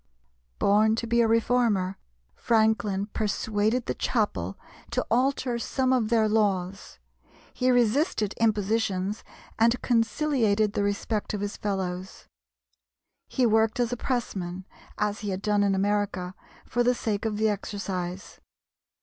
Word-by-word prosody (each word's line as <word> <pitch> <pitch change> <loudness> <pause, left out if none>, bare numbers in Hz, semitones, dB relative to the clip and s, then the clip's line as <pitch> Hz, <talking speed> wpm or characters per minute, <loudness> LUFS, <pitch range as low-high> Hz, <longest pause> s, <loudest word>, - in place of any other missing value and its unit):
Born 215 +2 +3
to 230 - -3
be 235 +1 +2
a 230 - +3
reformer, 225 -4 +1 0.3
Franklin 220 - +1
persuaded 215 +2 0
the - - -1
chapel 100 - -1 0.3
to 250 +2 -1
alter 250 0 +1
some 260 +2 0
of 235 -4 +1
their 225 -2 +3
laws; 195 -3 -1 0.6
he 255 - +1
resisted 245 - +2
impositions, 210 -2 0 0.4
and 235 +2 +4
conciliated 225 -3 +1
the - - 0
respect 205 +1 -1
of 200 - -4
his 205 +1 -3
fellows. 190 -2 -4 1.0
He 255 - +1
worked 220 0 +2
as 240 0 +1
a - - 0
pressman, 190 -8 -3 0.3
as 210 0 -1
he 210 - -4
had 190 +1 -4
done 210 -1 +2
in 200 -1 +2
America, 200 -2 -1 0.3
for 245 - -1
the 245 +1 +3
sake 210 -4 -2
of 220 -2 -1
the 220 0 +2
exercise. 195 -2 -4
215 Hz, 130 wpm, -26 LUFS, 200-235 Hz, 1.0 s, and